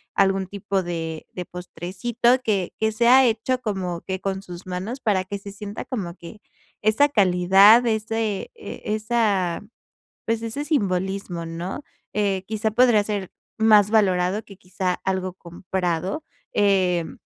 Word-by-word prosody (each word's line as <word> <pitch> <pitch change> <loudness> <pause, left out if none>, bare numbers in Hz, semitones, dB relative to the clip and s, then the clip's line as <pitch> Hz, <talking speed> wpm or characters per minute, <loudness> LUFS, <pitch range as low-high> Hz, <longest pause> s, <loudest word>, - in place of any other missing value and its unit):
algún 195 -1 +2
tipo 200 0 -2
de 165 -2 -5
de 180 - -5
postrecito 190 +8 -1
que 200 -6 0
que 220 0 +1
sea 245 +4 +6
hecho 240 +2 +1
como 185 -6 -3
que 190 0 -5
con 195 0 -2
sus 180 -1 -10
manos 190 +9 -4
para 200 -6 +1
que 200 +2 -4
se 200 0 -9
sienta 205 +1 -7
como 185 -9 -4
que 185 +4 -12 0.4
esa 215 +7 +4
calidad, 195 +1 +6
ese 220 -2 -1
e 440 - -9
esa, 210 -5 0 0.6
pues 225 0 0
ese 230 +6 -3
simbolismo, 190 - -1
¿no? 170 - -5 0.3
Eh, 195 -3 0
quizá 220 0 -1
podría 230 -2 +4
ser 200 -3 -3 0.3
más 210 -2 +5
valorado 195 -1 +2
que 195 - -14
quizá 180 0 -2
algo 185 -1 -1
comprado. 180 - -3 0.3
Em, 185 -4 +1
195 Hz, 140 wpm, -23 LUFS, 180-220 Hz, 0.6 s, sea